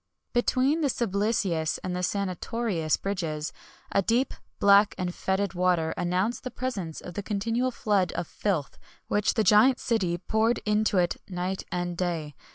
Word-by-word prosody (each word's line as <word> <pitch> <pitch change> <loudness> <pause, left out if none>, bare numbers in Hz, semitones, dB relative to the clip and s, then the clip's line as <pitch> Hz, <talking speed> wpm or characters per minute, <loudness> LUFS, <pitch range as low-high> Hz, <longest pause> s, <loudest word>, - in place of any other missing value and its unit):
Between 260 +5 +2
the 295 - +3
Sublicius 200 -8 0
and 185 - -3
Senatorius 190 -2 -1
bridges, 165 -6 -3 0.4
a 195 - +3
deep, 235 +7 +1 0.2
black, 200 +1 +5
and 180 -1 -2
fetid 195 +2 -1
water 175 -3 +1
announced 185 +7 -1
the 255 - -3
presence 220 -10 -4
of 175 - -8
the 205 - -3
continual 225 +5 0
flood 205 -7 +1
of - - -2
filth 170 -5 -2 0.3
which 205 0 +1
the 220 - +3
giant 225 +5 +5
city 190 -8 0
poured 220 +5 +1
into 210 -1 +2
it 175 -2 +2
night 185 +1 -3
and 175 -1 -2
day. 170 -4 -2
195 Hz, 150 wpm, -27 LUFS, 175-225 Hz, 0.4 s, black